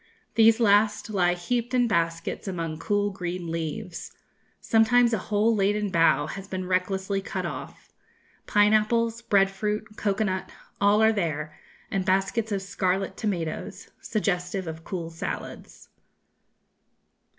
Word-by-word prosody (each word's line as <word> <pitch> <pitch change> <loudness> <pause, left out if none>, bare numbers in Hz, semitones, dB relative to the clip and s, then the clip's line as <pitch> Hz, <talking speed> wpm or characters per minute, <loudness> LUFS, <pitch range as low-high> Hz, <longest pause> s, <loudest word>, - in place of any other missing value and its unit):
These 225 0 +5
last 215 0 +3
lie 180 -3 +2
heaped 240 +7 -2
in 245 -1 +3
baskets 165 -1 -1
among 165 -4 -3
cool 205 +2 0
green 180 -2 -4
leaves. 165 +3 -5 0.5
Sometimes 235 +2 +4
a 220 - +1
whole 215 +2 +3
laden 205 0 +1
bough 165 -5 +4
has 195 +5 -7
been 185 -1 -4
recklessly 190 +2 -1
cut - - -4
off. - - -8 0.5
Pine 210 +1 +4
apples, 230 +2 +2
bread 195 -4 +3
fruit, 210 +2 -2
cocoa 205 +1 0
nut, 190 -2 -2 0.3
all 205 +2 +4
are 220 0 +5
there, 155 -6 -2 0.4
and 195 -1 0
baskets 195 +4 0
of 195 -1 -1
scarlet 190 0 -1
tomatoes, 175 -7 -4
suggestive 185 -3 -1
of 160 0 -7
cool 170 -3 -5
salads." 165 - -7
195 Hz, 130 wpm, -26 LUFS, 180-215 Hz, 0.5 s, These